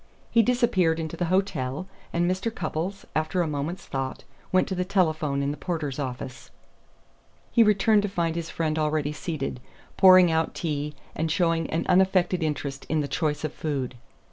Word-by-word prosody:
He 230 - +6
disappeared 220 -9 +2
into 160 -1 -4
the 175 - -1
hotel, 180 -4 -1 0.2
and 170 0 +1
Mr. 185 +5 0
Cupples, 180 +1 -4
after 155 +3 +1
a - - -2
moment's 150 +4 -3
thought, 135 -1 -4 0.3
went 185 - +3
to - - -1
the 180 0 0
telephone 155 -7 +1
in 140 - 0
the 145 - -5
porter's 150 -4 -3
office. 130 -1 -5 1.0
He 235 - +4
returned 210 0 +4
to 205 - -2
find 170 -3 -1
his 170 -1 -4
friend 160 -1 -1
already 150 -1 0
seated, 150 -5 -4 0.4
pouring 185 -2 +8
out 160 0 0
tea, 150 -2 -3 0.2
and 160 +1 -1
showing 165 -1 +1
an 160 - -1
unaffected 185 -1 +3
interest 145 -3 -3
in 155 0 +1
the 145 - -2
choice 150 -1 -1
of 155 - -2
food. 140 -5 -3
160 Hz, 170 wpm, -26 LUFS, 150-185 Hz, 1.0 s, pouring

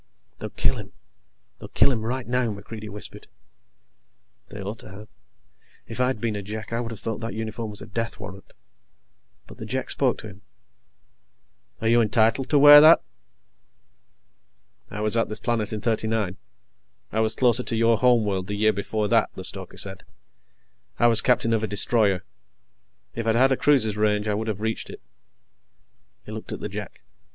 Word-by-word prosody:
"They'll - - -5
kill - - 0
him. - - -9 0.7
They'll - - -9
kill 140 - +3
him 115 -4 -2
right 125 +2 -3
now," 125 -1 0
MacReidie 105 +1 -8
whispered. 105 +1 -6 1.2
They 105 - -10
ought 100 +3 -6
to - - -11
have. 105 +3 -12 0.8
If 115 +2 -9
I'd 125 -2 0
been 110 -1 -2
a 100 - -4
Jek, 110 +3 -7
I 115 - 0
would 120 -1 -4
have 110 - -7
thought 110 +2 -4
that 115 0 -5
uniform 110 0 -5
was 105 -1 -7
a - - -9
death 115 +1 -4
warrant. 100 -2 -10 0.9
But - - -15
the 110 - -6
Jek 130 +3 -3
spoke 130 -3 +1
to 110 - -8
him: 100 -1 -13 1.4
"Are 110 - 0
you 120 +1 +4
entitled 115 +4 +2
to 150 - +3
wear 145 +1 +10
that?" 160 +2 +7 1.9
"I 105 - -6
was 110 +1 +2
at 115 - +1
this 110 - -4
planet 115 -3 -1
in 105 -1 -4
'39. 110 -4 -1 0.8
I 110 - -1
was 110 0 +2
closer 125 -1 +3
to 120 - -2
your 115 0 +3
home 120 -3 +4
world 95 -2 -2
the 105 - -3
year 110 +1 +2
before 105 +1 -2
that," - - +2
the - - -7
stoker - - -3
said. 95 -3 -2 0.9
"I - - +2
was 115 -1 +5
captain 115 -2 +2
of 110 - +1
a 110 - -1
destroyer. 105 -2 +2 0.9
If 115 -1 -4
I'd 110 - +2
had 130 +3 +4
a - - +4
cruiser's 125 -8 +2
range, 105 0 +1
I 105 - +1
would 110 +2 -3
have 105 -2 -3
reached 110 0 -3
it." - - -9 1.3
He - - -9
looked - - -7
at - - -5
the - - -5
Jek. - - -8
110 Hz, 185 wpm, -24 LUFS, 105-115 Hz, 1.9 s, wear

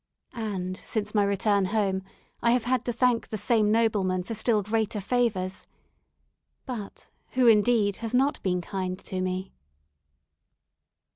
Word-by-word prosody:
And 195 -6 -3
since 210 -1 -3
my 210 -2 +3
return 200 0 +2
home 195 -1 0 0.4
I 235 0 +4
have 245 -2 +1
had 250 0 +1
to 245 - 0
thank 240 0 +1
the 215 - -3
same 210 0 +2
nobleman 205 -5 +1
for 225 - -5
still 220 -1 +1
greater 215 +1 -1
favours. 200 -4 -1 1.0
But 230 -7 -7 0.2
who, 255 -1 +3
indeed, 215 -2 +4
has 230 +1 -3
not 270 +3 +2
been 180 -2 0
kind 185 0 -3
to 185 -1 -5
me? 185 +1 -3
210 Hz, 140 wpm, -27 LUFS, 190-230 Hz, 1.0 s, I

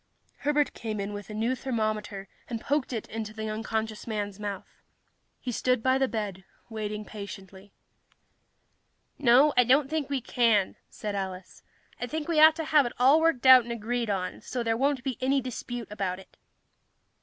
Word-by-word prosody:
Herbert 295 0 +1
came 215 -2 -5
in 200 +1 -3
with 205 +1 -7
a - - -6
new 230 +4 0
thermometer 215 -6 -3 0.2
and 230 -2 -3
poked 280 +3 -1
it 225 -4 -4
into 220 -1 -5
the 220 0 -4
unconscious 220 0 -3
man's 205 -2 -3
mouth. 205 -2 -7 0.6
He 250 - -4
stood 250 0 0
by 260 0 +3
the 265 - +2
bed, 205 -6 -4 0.3
waiting 210 -1 -4
patiently. 195 -1 -10 1.5
"No, 275 +3 +5
I 250 - +6
don't 270 +4 +3
think 310 -3 -1
we 280 -1 0
can," 230 -5 +2
said 210 -1 -5
Alice. 190 -2 -6 0.4
"I 245 - -3
think 310 +3 -4
we 330 -2 +2
ought 315 0 +8
to 320 -1 -4
have 300 -4 +4
it - - -7
all 270 +6 +5
worked 320 -6 +1
out 260 -1 +10
and 235 0 -7
agreed 235 0 -2
on, 185 -2 -2
so 245 -2 -4
there 225 -1 +1
won't 270 +1 0
be 260 -5 -3
any 270 +2 +2
dispute 245 -2 -6
about 195 -3 -2
it." 190 - -16
230 Hz, 180 wpm, -28 LUFS, 210-260 Hz, 1.5 s, out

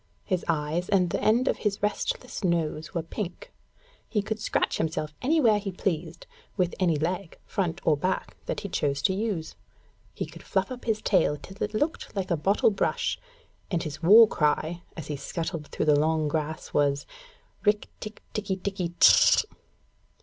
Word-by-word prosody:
His 185 -4 -1
eyes 160 +2 -1
and 180 -4 +3
the - - -1
end 235 +5 +3
of - - +2
his 205 -1 -2
restless 210 +3 -2
nose 160 -3 0
were 170 - 0
pink; 210 - -6 0.6
he 210 -3 0
could 220 +1 -3
scratch - - 0
himself 155 -1 -2
anywhere 250 -7 +4
he 200 -1 -4
pleased, 170 -3 -3 0.3
with 180 -2 +1
any 175 -4 +3
leg, 175 +4 -2
front 175 -5 -2
or 155 - +5
back, 185 +6 -2
that - - -2
he - - -4
chose 140 -6 -1
to 190 - +3
use; 195 -6 -3 0.6
he - - -4
could - - -12
fluff - - -1
up 250 -1 -7
his 220 -2 0
tail 170 -6 +3
till 190 +6 -13
it - - -2
looked 295 +2 -2
like 190 -2 -2
a - - +4
bottle 195 +8 +3
brush, 200 - -1 0.5
and 175 -4 0
his 155 0 -6
war 215 +7 +9
cry, 155 0 0 0.2
as 160 - -5
he 150 - -4
scuttled 165 +1 -4
through - - -2
the 150 -1 +5
long 155 0 +1
grass, 155 +1 -3
was: 145 -1 +2 0.6
'_Rikk 210 0 +2
tikk 215 0 -8
tikki 205 -3 -1
tikki 185 -2 -4
tchk! - - +7
180 Hz, 175 wpm, -27 LUFS, 155-210 Hz, 0.6 s, war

